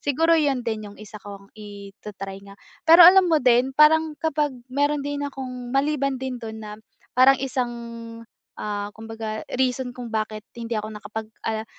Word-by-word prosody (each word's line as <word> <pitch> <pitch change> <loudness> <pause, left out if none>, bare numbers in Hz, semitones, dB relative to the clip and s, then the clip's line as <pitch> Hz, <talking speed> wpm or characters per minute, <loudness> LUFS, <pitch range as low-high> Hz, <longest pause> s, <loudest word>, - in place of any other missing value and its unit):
Siguro 325 +4 +2
yun 275 -5 +1
din 220 -2 -3
yung 205 - -15
isa 210 0 -10
kong 200 -1 -11
ita-try 200 -1 -9
nga. 200 0 -13 0.3
Pero 335 +2 +9
alam 375 +1 +8
mo 320 - +4
din 250 +2 +3
parang 315 +1 +5
kapag 300 -2 0 0.2
meron 290 +1 +1
din 285 0 -3
akong 255 -3 -7
maliban 275 -1 +1
din 260 -1 -3
dun 220 -1 -7
na 210 0 -8 0.4
parang 265 +1 +7
isang, 250 -2 -2 0.9
ah, 205 -1 -4
kumbaga 220 -1 -6 0.2
reason 255 0 0
kung 245 -1 -6
bakit 215 0 -3
hindi 230 -1 -4
ako 215 - -5
nakapag, 215 +1 -7 0.2
ah 220 0 -2
245 Hz, 165 wpm, -23 LUFS, 215-285 Hz, 0.9 s, Pero